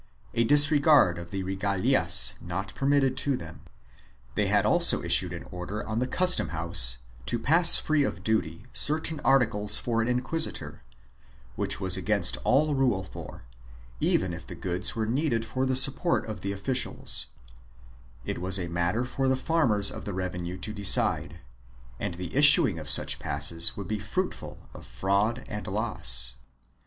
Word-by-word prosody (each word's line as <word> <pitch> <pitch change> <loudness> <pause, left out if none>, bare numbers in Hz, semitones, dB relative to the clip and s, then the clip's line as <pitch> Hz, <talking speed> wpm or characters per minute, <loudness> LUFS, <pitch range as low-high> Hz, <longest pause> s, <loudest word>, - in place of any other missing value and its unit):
a 115 - +1
disregard 145 - +5
of 85 - -10
the 95 -1 -5
regalias 95 0 +1
not 95 +3 -6
permitted 135 -1 0
to 135 -1 0
them. 80 - -11 0.7
They - - -1
had - - +1
also - - +5
issued - - +1
an - - -8
order 90 +4 -7
on 110 +1 -3
the 125 - -2
custom 180 +7 +1
house 80 -8 +2 0.3
to - - 0
pass 165 +9 +6
free 155 -2 0
of 90 -8 -5
duty 90 -4 -2
certain 155 +1 0
articles 110 -7 +4
for 115 -1 +1
an 115 - -2
inquisi 130 +6 0
tor, - - -8 0.7
which - - -3
was - - +1
against - - -1
all 150 +3 +1
rule 125 -8 0
for, 95 - -11 0.6
even 90 -2 0
if 85 0 -10
the 85 - -9
goods 90 +1 -3
were 110 -1 -2
needed 115 -1 -2
for 130 +4 -3
the 130 - -1
support 135 +6 +2
of 110 -5 -8
the 100 - -4
officials, 125 +6 -3 1.0
it - - -5
was 95 +2 +1
a 90 - -4
matter 90 +8 -2
for 135 +1 -3
the 130 - +1
farmers 130 -8 +1
of - - -9
the 100 - -5
revenue 90 -1 -5
to 105 +3 -6
decide, 100 -2 0 0.6
and 85 - -5
the 90 +4 -8
issuing 140 - +5
of 75 -1 -3
such - - +3
passes 80 +4 -1
would 100 -3 -7
be 110 -1 -4
fruitful 180 - -5 0.2
of - - -13
fraud 100 - -2
and 105 -1 -7
loss. 95 - +1
105 Hz, 165 wpm, -26 LUFS, 90-135 Hz, 1.0 s, pass